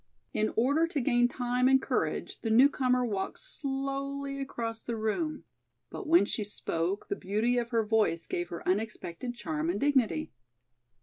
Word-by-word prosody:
In 215 - +1
order 285 +8 +3
to 320 -3 -2
gain 240 -2 +3
time 250 0 +1
and 265 0 +6
courage - - -2
the 225 - -2
newcomer 250 +1 +4
walked 200 -4 -2
slowly 275 - -4
across 230 -4 -4
the 235 - -4
room, 300 +9 -1 0.5
but - - -6
when 325 -8 +6
she 210 - -2
spoke 190 -2 -2
the - - -1
beauty 215 +6 +1
of 235 -1 -3
her 230 -3 +1
voice 210 -6 +2
gave 175 0 -3
her 170 - -7
unexpected 210 +3 -2
charm 160 -7 -2
and 190 +4 0
dignity. 235 - +2
240 Hz, 160 wpm, -30 LUFS, 210-275 Hz, 0.5 s, and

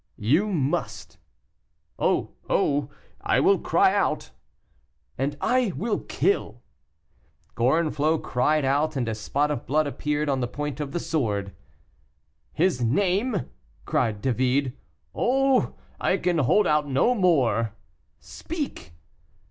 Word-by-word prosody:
"You 150 - +2
must." 145 -7 -2 0.8
"Oh! - - +1 0.2
oh! 145 -1 +1 0.3
I - - +2
will - - +4
cry - - +3
out." - - 0 0.8
"And 140 +3 -2
I 250 -6 +1
will 220 +1 -1
kill." 120 - -1 0.9
Gorenflot 155 +4 +1
cried 150 +4 +1
out, 145 +3 +1
and 125 -4 -1
a 110 - -1
spot 140 +7 -1
of 145 - -4
blood 155 +3 +2
appeared 150 +1 -2
on 135 -2 +1
the 125 - -1
point 150 +3 -5
of 145 -2 -4
the 175 - -2
sword. 105 - -2 1.0
"His 165 -5 +1
name?" 190 - +1 0.4
cried 105 -2 -1
David. 130 +1 +1 0.4
"Oh! 270 +1 +2 0.2
I - - +1
can 175 -2 0
hold 175 - +3
out 150 -2 +1
no 135 - +3
more." 130 - +2 0.4
"Speak." 95 - -6
145 Hz, 120 wpm, -25 LUFS, 125-175 Hz, 1.0 s, will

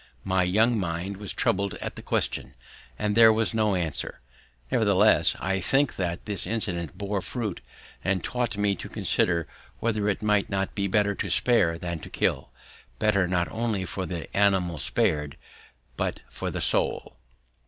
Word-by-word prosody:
My 95 -1 +1
young 110 +6 +2
mind 90 +2 -4
was 105 -1 -5
troubled 100 +1 -1
at - - -6
the - - -9
question, - - -2 0.4
and 105 0 -1
there 115 0 +7
was 110 0 +1
no 110 -3 +1
answer. 85 -5 -2 0.5
Nevertheless, - - +4
I 95 0 -1
think 135 +8 +1
that 90 -2 -3
this 100 -5 +5
incident 90 -7 -3
bore 100 -1 -3
fruit 105 -1 -5
later, - - -34 0.5
and 95 -3 -1
taught 120 -4 -2
me 105 -1 +1
to - - -8
consider 85 -2 0 0.3
whether 110 -3 0
it 100 - -2
might 105 -1 +1
not 95 -1 -2
be 100 -1 -1
better 100 +1 +1
to 100 - -4
spare 85 -3 +5
than 85 -1 -5
to - - -10
kill; - - -1 0.5
better 100 -4 +2
not 85 -1 0
only 110 -4 -2
for 95 +2 -5
the 85 -1 -7
animal 95 -5 +2
spared, 75 +1 0 0.6
but - - -2
for - - -4
the - - -4
soul. - - +2
100 Hz, 165 wpm, -26 LUFS, 90-105 Hz, 0.6 s, there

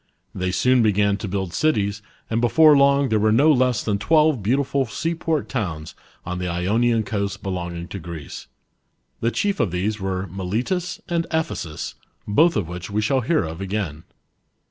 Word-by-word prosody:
They 95 -2 -2
soon 125 +7 +3
began 100 -2 +2
to 105 - -5
build 95 -2 -3
cities, 105 -9 0 0.3
and 115 +1 -1
before 150 +5 +6
long,. 140 -1 +4
there 110 - +2
were 110 +1 +3
no 140 +8 +5
less 125 -5 +2
than 100 -2 -1
twelve 155 -2 +3
beautiful 135 +4 +1
seaport 160 +5 -2
towns 85 - -4 0.3
on 90 0 -4
the 90 - -2
Ionian 110 +7 +1
coast 100 0 -3
belonging 85 -3 -4
to 100 - -6
Greece. 80 -4 -8 0.7
The 115 - +1
chief 200 +10 -1
of 105 - +2
these 100 +5 -2
were 95 -1 -2
Miletus 105 - -3
and 170 -1 -1
Ephesus, 160 - -3 0.3
both 160 +11 +4
of 95 -6 -1
which 90 0 -7
we 105 +1 -1
shall 130 +4 +2
hear 155 +7 +1
of 80 +2 -6
again. 95 -6 -3
105 Hz, 165 wpm, -22 LUFS, 95-135 Hz, 0.7 s, before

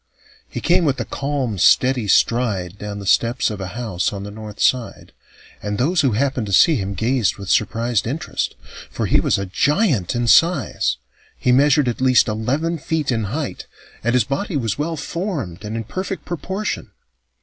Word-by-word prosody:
He - - -5
came 175 0 +3
with 140 -4 +1
a - - -2
calm, 135 -7 -3
steady 125 +3 +4
stride 100 -5 +1
down 105 0 -5
the 100 - -7
steps 120 +5 +2
of 105 -2 -6
a 95 - -4
house 105 -8 -1
on 100 -1 -6
the 100 - -7
north 105 0 -9
side, 125 -3 0 0.5
and 105 0 -3
those 160 - +2
who 135 -5 +2
happened 130 -1 0
to 100 - -4
see 160 - +6
him 100 -4 -3
gazed 115 +2 +1
with 100 -2 -4
surprised 115 0 +1
interest. 145 +7 -3 0.3
For - - -3
he - - +3
was - - +1
a 100 - -3
giant 135 - +1
in 120 0 0
size. 120 - +3 0.4
He 125 - +1
measured 140 +1 +4
at 120 +1 -2
least 130 -1 +4
eleven 140 +10 -1
feet 150 -1 -1
in 115 -3 0
height, 135 +7 -4 0.4
and 120 +2 +1
his 125 - +4
body 145 +5 -2
was 115 -6 -1
well 160 +2 -2
formed 145 - -4
and 105 +2 -4
in 115 - -3
perfect 185 - -5
proportion. 190 +5 -4
120 Hz, 185 wpm, -20 LUFS, 105-145 Hz, 0.5 s, see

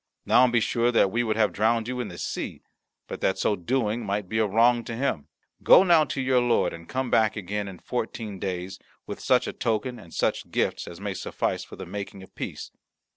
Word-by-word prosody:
Now 130 - +6
be 120 -1 +2
sure 120 +2 +1
that 100 -5 +3
we 120 - +1
would 110 -3 0
have 110 -1 +2
drowned 115 +2 +1
you 125 0 -3
in 120 - -2
the 85 -3 -9
sea, - - -5 0.4
but - - -7
that 95 - +1
so 105 - +1
doing 115 +4 -1
might 100 -1 -2
be 110 +4 -1
a 110 - +3
wrong 115 +3 +3
to 115 - -5
him. 125 - -1 0.3
Go - - +8
now 170 -4 +5
to 140 - -4
your 130 -1 +3
lord, 120 -1 +2
and 85 0 -11
come 130 -1 -2
again 105 -2 +1
in 95 -2 -8
fourteen 110 -2 -4
days 95 0 -4 0.3
with - - -6
such - - +2
a - - -4
token 120 +2 -2
and 85 -6 -14
such - - -1
gifts - - -1
as 85 - -9
may 100 -1 -3
suffice - - -2
for - - -11
the - - -8
making 100 +1 -7
of 95 - -16
peace." - - -6
110 Hz, 220 wpm, -26 LUFS, 100-120 Hz, 0.4 s, Go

